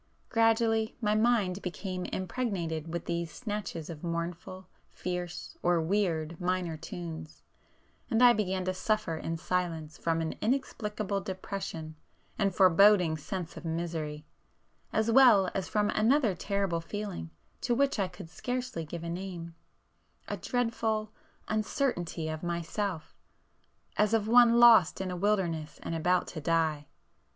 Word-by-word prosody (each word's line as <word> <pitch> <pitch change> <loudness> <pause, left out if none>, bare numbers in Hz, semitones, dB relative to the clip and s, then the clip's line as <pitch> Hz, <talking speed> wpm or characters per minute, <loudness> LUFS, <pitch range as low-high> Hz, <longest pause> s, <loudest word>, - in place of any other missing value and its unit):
Gradually 225 -1 +2
my 210 -3 +1
mind 215 -4 +2
became 185 0 -4
impregnated 175 -6 -3
with 170 - -4
these 170 -1 -2
snatches 205 -8 -5
of 160 -1 -8
mournful, 175 +2 -4 0.2
fierce, 180 -1 -5
or 175 -1 +3
weird 165 -2 0
minor 180 -2 0
tunes,—and 165 - -6
I 245 -1 +9
began 190 -4 -1
to 185 - 0
suffer 215 -2 0
in 165 +1 -3
silence 165 -3 -2
from 165 -1 0
an 160 -1 -2
inexplicable 210 -5 -1
depression 185 -4 -5 0.4
and 200 -2 +2
foreboding 185 -1 +5
sense 170 +3 -5
of - - -9
misery, 160 -2 -3 0.7
as 220 +1 +1
well 225 -7 +6
as 190 -2 -3
from 210 -1 +1
another 230 0 +3
terrible 195 -1 -1
feeling 200 - -5 0.3
to 240 - +1
which 275 -2 +2
I 195 - +2
could 180 -2 -11
scarcely 250 -6 -3
give 165 +2 -6
a - - -4
name,—a 170 -2 -9
dreadful 225 -3 -1 0.4
uncertainty 215 - -1
of 155 0 -4
myself, 170 +1 -3 0.8
as 210 +1 +3
of 215 -1 0
one 235 0 +6
lost 230 -8 +7
in 190 -1 -3
a - - -3
wilderness 175 -5 0
and - - -3
about 180 +3 +2
to 155 - -6
die. 155 -2 +1
185 Hz, 130 wpm, -30 LUFS, 165-215 Hz, 0.8 s, I